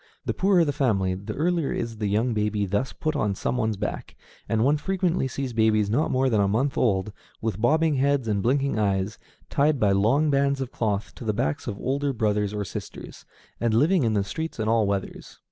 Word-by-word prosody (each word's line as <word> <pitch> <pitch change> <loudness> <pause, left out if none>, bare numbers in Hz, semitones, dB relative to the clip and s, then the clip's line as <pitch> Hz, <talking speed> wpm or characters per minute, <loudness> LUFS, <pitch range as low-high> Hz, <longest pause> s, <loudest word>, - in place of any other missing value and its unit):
The - - -1
poorer 190 -3 +3
the 145 - -1
family, 105 -10 +1
the 100 +3 -6
earlier 170 -1 0
is 115 -1 -3
the 105 -1 -1
young 110 +4 +1
baby 105 -1 0
thus 100 +7 -1
put 155 -1 -3
on 105 -8 0
some 120 - -2
one's 110 -4 0
back, - - -5 0.3
and 110 -1 +2
one 145 +4 +3
frequently 180 -3 0
sees 130 -1 -4
babies 110 -2 +2
not 145 +8 +1
more 130 +1 +2
than 110 -5 +2
a 100 - +2
month 125 +8 0
old, 100 -3 +1 0.3
with 110 -3 -3
bobbing 155 +4 +3
heads 140 -2 +1
and 105 -2 0
blinking 135 +1 +1
eyes, 100 0 0 0.3
tied 145 0 +2
by 105 -3 +3
long 125 +10 +3
bands 140 0 +2
of 135 -1 -4
cloth 105 -2 -2
to - - -10
the 110 -2 0
backs 135 +6 -2
of 100 - -3
older 140 +3 -1
brothers 105 -3 0
or 105 -1 -3
sisters, - - -8 0.3
and 115 -2 +1
living 160 +9 +3
in 115 -4 +1
the 100 - +2
streets 160 +8 -5
in 110 - -1
all 110 -2 +3
weathers. 100 -1 -4
115 Hz, 215 wpm, -25 LUFS, 105-140 Hz, 0.3 s, poorer